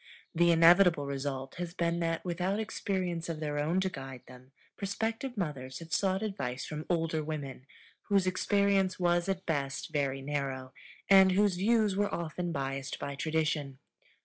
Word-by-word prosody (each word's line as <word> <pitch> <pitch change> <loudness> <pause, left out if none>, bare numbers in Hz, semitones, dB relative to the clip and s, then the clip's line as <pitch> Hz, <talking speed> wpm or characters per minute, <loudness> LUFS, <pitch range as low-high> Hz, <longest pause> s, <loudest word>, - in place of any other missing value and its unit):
The 170 +1 +4
inevitable 170 -1 +6
result 135 -1 -4
has 175 0 -4
been 170 0 0
that, 165 0 -1
without 185 +3 -1
experience 185 -6 -2
of 160 -2 -3
their 150 -1 -2
own 160 +5 +1
to 190 - 0
guide 135 -6 -8
them, 125 +1 -15 0.2
prospective 225 +5 -3
mothers 135 -8 -3
have 165 +1 -9
sought 190 +1 +1
advice 130 -12 -3
from 155 0 -6
older 165 -2 0
women, 140 -4 -6 0.4
whose 200 -2 +3
experience 195 0 +2
was 175 +1 +2
at 190 -1 -2
best 140 -1 -2
very 135 -2 -1
narrow, 135 -2 -3 0.3
and 190 -1 +7
whose 200 -1 +3
views 215 0 +2
were 205 +1 +1
often 170 +1 -3
biased 135 -2 -3
by 140 - -4
tradition. 155 -2 -1
165 Hz, 155 wpm, -31 LUFS, 140-190 Hz, 0.4 s, and